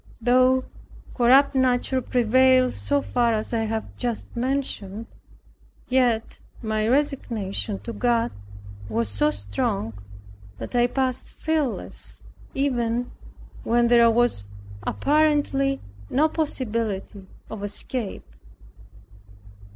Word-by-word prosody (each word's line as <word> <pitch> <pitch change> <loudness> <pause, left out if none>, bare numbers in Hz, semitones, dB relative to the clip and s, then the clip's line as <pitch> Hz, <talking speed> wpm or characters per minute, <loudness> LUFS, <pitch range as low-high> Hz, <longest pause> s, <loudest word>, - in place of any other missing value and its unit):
Though 255 +2 +4 0.5
corrupt 265 +3 +5
nature 260 0 +2
prevailed 255 +2 +3
so 285 0 0
far 235 -2 +1
as 215 +2 -4
I 225 -1 +1
have 220 0 -4
just 240 -3 -4
mentioned, 235 -5 -2 0.8
yet 245 -3 +1 0.2
my 215 -1 0
resignation 230 -7 -1
to 235 - -6
God 235 +1 +1 0.6
was 110 -1 -1
so 100 0 +2
strong, 100 +2 -2 0.6
that - - -7
I 240 0 +4
passed 260 0 -1
fearless, 310 -6 -2 0.3
even 245 -3 0 0.5
where 235 +1 +3
there 235 -1 +6
was 230 - +2 0.3
apparently 285 - +1 0.3
no 300 +4 +3
possibility 225 - -2 0.2
of 210 -2 -6
escape. 205 +2 -4
240 Hz, 95 wpm, -24 LUFS, 220-260 Hz, 0.8 s, there